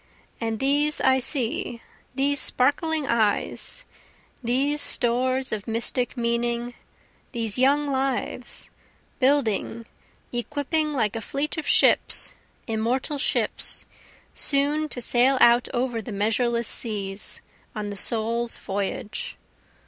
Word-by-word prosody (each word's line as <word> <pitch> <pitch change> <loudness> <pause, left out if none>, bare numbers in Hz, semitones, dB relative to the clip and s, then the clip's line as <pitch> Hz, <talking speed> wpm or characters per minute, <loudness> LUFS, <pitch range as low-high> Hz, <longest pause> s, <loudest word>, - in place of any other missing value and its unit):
And 225 -1 -2
these 290 +2 +1
I 265 0 +3
see, 245 -3 0 0.4
these 280 +1 +1
sparkling 290 +5 +1
eyes, 235 - 0 0.6
These 275 +5 +1
stores 255 +2 +2
of 215 0 -4
mystic 235 +3 -1
meaning, 235 0 -1 0.6
these 230 -1 -1
young 285 +3 +3
lives, 265 -3 -3 0.5
Building, 240 -4 +1 0.5
equipping 295 +5 -1
like 220 -6 0
a 225 - -3
fleet 280 +7 -3
of 315 - -5
ships, - - +3 0.3
immortal 245 +6 -2
ships, - - +2 0.5
Soon 295 +2 +2
to 250 - -6
sail 250 +3 +3
out 240 +1 +5
over 245 -2 -2
the 220 - -8
measureless 230 +3 0
seas, 200 -3 -1 0.3
On 210 -1 -4
the - - -6
soul's 230 +3 +2
voyage. 205 - -4
245 Hz, 110 wpm, -24 LUFS, 230-280 Hz, 0.6 s, out